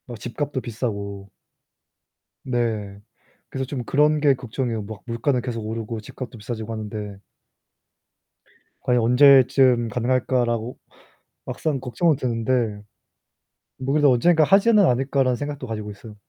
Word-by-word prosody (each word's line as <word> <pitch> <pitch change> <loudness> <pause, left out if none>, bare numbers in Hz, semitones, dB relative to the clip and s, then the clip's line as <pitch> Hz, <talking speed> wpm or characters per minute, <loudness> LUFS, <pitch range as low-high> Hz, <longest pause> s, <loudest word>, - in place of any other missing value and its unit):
뭐 120 -2 -8
집값도 135 +5 -4
비싸고. 100 -5 -5 1.1
네. 110 -5 -2 0.5
그래서 135 0 -3
좀 130 -2 -4
그런 150 +5 +2
게 145 -2 +4
걱정이에요. 125 -3 -4
막 105 0 -9
물가는 125 +3 0
계속 120 -2 -4
오르고 110 0 -4
집값도 120 +3 -9
비싸지고 110 +1 -6
하는데 105 -2 -6 1.6
'과연 125 -1 +2
언제쯤 125 -1 +5
가능할까?'라고 120 0 0 0.7
막상 150 -4 -2
걱정은 135 +6 +1
드는데 115 -4 -1 1.0
'뭐 135 +1 -2
그래도 145 -2 +4
언젠가 160 +6 +4
하지는 200 +4 +5
않을까?'라는 130 -1 +1
생각도 145 0 -5
가지고 105 -2 -5
있어요. 105 +1 -12
125 Hz, 300 characters per minute, -23 LUFS, 110-135 Hz, 1.6 s, 언제쯤